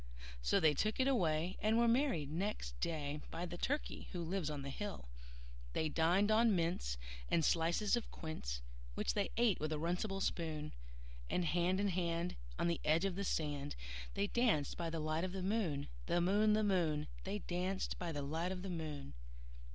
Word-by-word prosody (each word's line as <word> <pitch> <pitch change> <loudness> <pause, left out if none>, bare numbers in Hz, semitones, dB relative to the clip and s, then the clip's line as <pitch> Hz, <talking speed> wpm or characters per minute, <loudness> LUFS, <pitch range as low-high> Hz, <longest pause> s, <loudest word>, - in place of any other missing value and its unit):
So - - +3
they 155 -2 +5
took 215 - 0
it 260 - +4
away, 175 - +2
and 215 +2 +3
were 235 0 +5
married 230 - +2
next 175 - -2
day 150 - -2
By 175 - -3
the 175 0 -5
Turkey 290 +3 -2
who 175 -2 -2
lives 170 -1 -1
on 145 -2 -4
the 140 - -4
hill. 205 - -5 0.7
They 160 - +1
dined 175 +7 +3
on 220 -1 +5
mince 170 - 0 0.3
and 165 - +3
slices 170 +6 +3
of 240 - -3
quince, 60 - -5 0.3
Which - - 0
they - - +1
ate 230 -5 +4
with 155 +1 -1
a 155 - 0
runcible 180 +5 -1
spoon; 155 -5 -2 0.6
And 180 - +1
hand 175 +3 +2
in 205 0 +2
hand, 175 -1 0 0.2
on - - +1
the 170 -1 0
edge 160 +4 +3
of 195 - +1
the 200 - -2
sand, 145 -5 -1 0.4
They 200 - +2
danced 205 - +2
by 170 -1 -2
the 165 0 -2
light 155 +2 0
of 185 0 -2
the 190 -1 -3
moon, 185 -8 0 0.2
The 175 - +3
moon, 205 +5 +4
The 215 0 +3
moon, 165 -7 +2 0.2
They 195 +2 -2
danced 185 0 -2
by 175 -2 -2
the 145 -2 -3
light 160 +5 -1
of 185 -1 -4
the 195 - -3
moon. 155 - -4
175 Hz, 190 wpm, -37 LUFS, 155-195 Hz, 0.7 s, they